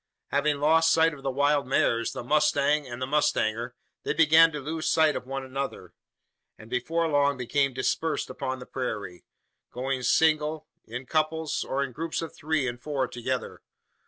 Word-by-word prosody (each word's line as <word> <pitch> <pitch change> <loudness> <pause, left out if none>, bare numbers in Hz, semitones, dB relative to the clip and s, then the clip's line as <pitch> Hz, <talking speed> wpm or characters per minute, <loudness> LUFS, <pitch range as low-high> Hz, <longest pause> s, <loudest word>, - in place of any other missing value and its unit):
Having 145 0 +1
lost 160 +2 +4
sight 165 0 +4
of 140 - -11
the 135 - -2
wild 145 +1 +1
mares, 115 -3 +1
the - - -6
mustang, 150 +1 +2
and 120 -1 -7
the 130 - -1
mustanger, 120 -4 0 0.3
they - - -2
began 165 +1 +6
to 150 - -5
lose 155 +3 -3
sight 160 -2 +3
of - - -5
one 135 0 -4
another; 135 +1 -5 0.6
and 110 +1 -14
before 165 +7 0
long 145 -2 +2
became 135 +3 0
dispersed 130 +5 -1
upon 130 -1 -4
the 125 - -10
prairie 105 -10 -5 0.5
going 130 +1 -2
single, 155 +2 +2 0.2
in 125 +4 -6
couples, 155 +2 -1
or 140 +1 -1
in 135 - -5
groups 165 +6 -3
of 165 - -7
three 150 -3 -1
and 120 0 -5
four 140 -2 -1
together. 125 +2 -4
140 Hz, 170 wpm, -27 LUFS, 130-155 Hz, 0.6 s, began